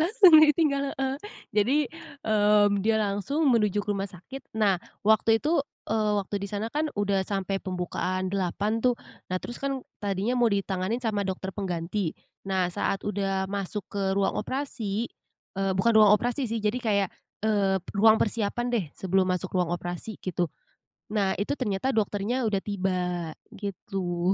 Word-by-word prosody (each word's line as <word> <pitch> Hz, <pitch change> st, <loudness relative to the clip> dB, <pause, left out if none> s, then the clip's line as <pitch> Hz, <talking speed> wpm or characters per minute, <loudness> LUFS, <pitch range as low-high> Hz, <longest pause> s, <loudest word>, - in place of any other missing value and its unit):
Langsung 365 Hz, 0 st, +6 dB
ditinggal, 300 Hz, -2 st, +4 dB, 0.2 s
heeh, 265 Hz, 0 st, 0 dB, 0.4 s
jadi, 215 Hz, +7 st, +3 dB, 0.5 s
mmm, 205 Hz, -1 st, +4 dB
dia 220 Hz, +1 st, +3 dB
langsung 210 Hz, +10 st, 0 dB
menuju 210 Hz, -3 st, +2 dB
ke -, -, -20 dB
rumah 195 Hz, 0 st, -2 dB
sakit. 195 Hz, +10 st, -10 dB
Nah 200 Hz, -5 st, +3 dB, 0.2 s
waktu 220 Hz, +1 st, +4 dB
itu, 305 Hz, +3 st, +2 dB, 0.3 s
eee, 215 Hz, -1 st, +1 dB
waktu 200 Hz, +1 st, -3 dB
di 200 Hz, -, -3 dB
sana 210 Hz, +2 st, -2 dB
kan 305 Hz, +1 st, 0 dB
udah 200 Hz, -1 st, +1 dB
sampai 195 Hz, 0 st, -2 dB
pembukaan 185 Hz, 0 st, -2 dB
8 200 Hz, +4 st, 0 dB
tuh, 250 Hz, -1 st, +3 dB, 0.3 s
nah 185 Hz, -, 0 dB
terus 240 Hz, -, -7 dB
kan 275 Hz, -1 st, -1 dB, 0.2 s
tadinya 200 Hz, +4 st, 0 dB
mau 240 Hz, -1 st, +5 dB
ditangani 195 Hz, +2 st, -1 dB
sama 220 Hz, -4 st, -1 dB
dokter 190 Hz, 0 st, -4 dB
pengganti, 180 Hz, -1 st, -2 dB, 0.4 s
nah 190 Hz, -2 st, +2 dB
saat 195 Hz, -, -1 dB
udah 195 Hz, -2 st, -1 dB
masuk 200 Hz, +1 st, -3 dB
ke 200 Hz, -1 st, -2 dB
ruang 195 Hz, -, +2 dB
operasi, 235 Hz, -5 st, -3 dB, 0.5 s
eee, 195 Hz, 0 st, +1 dB
bukan 230 Hz, +5 st, +3 dB
ruang 210 Hz, -2 st, +8 dB
operasi 245 Hz, +2 st, -1 dB
sih 230 Hz, -, 0 dB
jadi 210 Hz, +4 st, +1 dB
kayak, 200 Hz, -4 st, +2 dB, 0.4 s
eee, 200 Hz, -3 st, +2 dB, 0.2 s
ruang 220 Hz, +2 st, +6 dB
persiapan 230 Hz, +2 st, 0 dB
deh 225 Hz, -7 st, +1 dB
sebelum 190 Hz, 0 st, +1 dB
masuk 185 Hz, +1 st, -1 dB
ruang 180 Hz, -2 st, +1 dB
operasi 175 Hz, +5 st, -6 dB
gitu. 175 Hz, -2 st, -1 dB, 0.7 s
Nah, 195 Hz, -3 st, +1 dB
itu 205 Hz, +8 st, -1 dB
ternyata 255 Hz, -1 st, -1 dB
dokternya 220 Hz, +3 st, 0 dB
udah 205 Hz, -, +1 dB
tiba, 180 Hz, -4 st, -1 dB, 0.2 s
gitu. 185 Hz, -3 st, -2 dB
205 Hz, 155 wpm, -27 LUFS, 190-225 Hz, 0.7 s, ruang